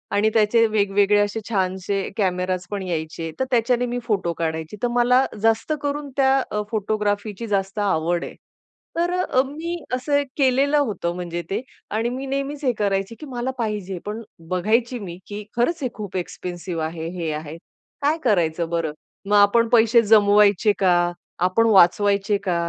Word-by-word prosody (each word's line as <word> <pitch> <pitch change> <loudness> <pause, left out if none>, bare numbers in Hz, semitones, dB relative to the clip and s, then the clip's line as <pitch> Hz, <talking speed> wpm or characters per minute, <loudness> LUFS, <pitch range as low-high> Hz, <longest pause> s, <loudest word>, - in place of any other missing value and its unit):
आणि 210 +2 +3
त्याचे 230 +1 +4
वेगवेगळे 205 -1 +2
असे 205 +2 0
छानसे 190 -1 -1
कॅमेरास 185 -2 -1
पण 205 -1 -3
यायचे. 165 -2 -4
तर 260 - +1
त्याच्याने 245 0 +2
मी 245 0 -3
फोटो 200 -7 0
काढायची. 160 +3 -4
तर - - +3
मला 245 +2 +4 0.2
जास्त 225 +7 +2
करून 290 0 -3
त्या 270 0 +4
अ, 210 - -1
फोटोग्राफीची 210 0 -2
जास्त 195 0 -1
आवड 175 -4 0
आहे. - - -9 0.6
तर 345 +1 +1
अ, 255 -7 +2
मी 320 +5 -5 0.2
असं 285 +3 +1 0.2
केलेलं 275 +1 +3
होतं 205 -11 -1
म्हणजे 175 -1 -4
ते. 205 +4 -1 0.3
आणि 225 +3 0
मी 260 +2 -5
नेहमीच 275 +2 -3
हे 255 - +4
करायची 195 +1 0
की 305 - -8
मला 255 -1 -3
पाहिजे, 210 -5 -3
पण 210 +2 -4 0.3
बघायची 230 +7 +1
मी 175 -5 -7
की 205 0 -6
"खरंच 290 +7 0
हे 255 - 0
खूप 205 -4 -8
एक्सपेन्सिव्ह 175 -1 -5
आहे. 160 0 -5
हे 165 -3 -2
आहे. 155 +1 -6 0.4
काय 295 +3 +2
करायचं 170 -7 +1
बरं? 165 -2 -1 0.3
मग 205 +1 +1
आपण 205 +3 +5
पैसे 230 0 +5
जमवायचे 210 -1 +5
का? 185 -2 +4 0.5
आपण 185 +6 +3
वाचवायचे 200 +1 +4
का? 180 -3 0
210 Hz, 160 wpm, -22 LUFS, 185-240 Hz, 0.6 s, आपण